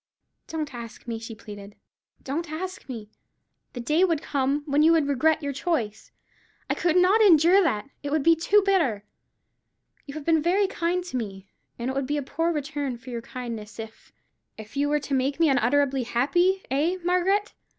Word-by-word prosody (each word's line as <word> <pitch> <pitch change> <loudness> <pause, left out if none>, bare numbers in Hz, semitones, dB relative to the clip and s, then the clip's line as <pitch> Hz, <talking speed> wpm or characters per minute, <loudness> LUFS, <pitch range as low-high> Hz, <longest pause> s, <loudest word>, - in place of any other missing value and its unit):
"Don't 310 -4 -4
ask 235 0 -9
me," 230 -1 -3
she 225 0 -8
pleaded; 205 -2 -11 0.5
"don't 300 +4 -4
ask 370 0 -6
me. 220 -4 -7 0.6
The 245 - -6
day 305 +9 +2
would 335 -5 +2
come 280 +1 0
when 290 0 +2
you 320 +2 +6
would 315 -4 +2
regret 310 +3 +2
your 280 0 -2
choice. 245 -9 -2 0.6
I - - +4
could 345 -1 0
not 375 +5 +5
endure 355 -1 +6
that. 245 - 0
It 285 - -4
would 300 0 0
be 330 +2 +6
too 395 +5 +3
bitter. 270 - +1 1.0
You 280 - -8
have 305 -2 -7
been 320 -2 +3
very 370 +5 +2
kind 360 -1 -1
to 350 -8 -4
me; 195 -4 -6 0.3
and 235 - -4
it - - -5
would 270 -1 -2
be 295 +1 -1
a 290 - -2
poor 330 +5 -1
return 290 -4 -3
for 255 +2 -11
your 235 -1 -4
kindness, 230 -4 -7
if——" 225 0 -10 0.5
"If 220 +3 -11
you 285 +1 +1
were 295 0 +2
to 285 -1 -5
make 270 +3 0
me 325 -2 +4
unutterably 270 +1 +2
happy, 345 +11 +1
eh, 315 +7 +1
Margaret? 370 +4 +1
285 Hz, 190 wpm, -25 LUFS, 245-335 Hz, 1.0 s, you